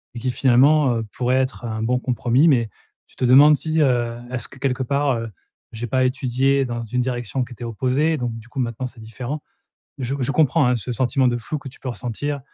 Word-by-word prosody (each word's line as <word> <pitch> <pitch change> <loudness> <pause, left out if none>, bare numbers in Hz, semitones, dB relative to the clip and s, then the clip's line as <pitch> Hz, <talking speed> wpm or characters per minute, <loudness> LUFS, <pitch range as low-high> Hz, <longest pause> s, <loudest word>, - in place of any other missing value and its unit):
et - - -5
qui, 125 +2 -1
finalement, 130 +2 +4
heu, 115 - -2
pourrait 125 0 0
être 130 -2 -2
un 110 -1 -3
bon 125 +2 +1
compromis 125 +3 +2
mais, 120 -7 +3 0.4
tu - - -22
te - - -4
demandes 145 +4 +7
si, 160 +1 -1
heu, 120 -4 +1
est-ce 125 -2 -4
que - - -14
quelque 130 -1 -1
part, 140 +1 +1
heu, 115 0 -5 0.4
j'ai 115 +1 -5
pas 130 +3 +1
étudié 135 +1 +1
dans 120 -1 -4
une 125 +3 -1
direction 125 0 -2
qui 125 - -9
était 120 - -10
opposée? 130 +7 0
Donc 120 -3 -3
du 115 - -15
coup 140 - -14
maintenant 120 +1 -2
c'est 125 -2 -14
différent. 120 +7 -6 0.6
Je 130 +1 -2
je 135 +2 0
comprends, 155 -1 +3
hein, 125 - +3
ce 120 +2 -5
sentiment 130 +1 +2
de 120 - 0
flou 145 +6 -4
que 135 - -9
tu 130 - -15
peux 130 - -4
ressentir. 130 +5 -4
125 Hz, 225 wpm, -22 LUFS, 120-135 Hz, 0.6 s, demandes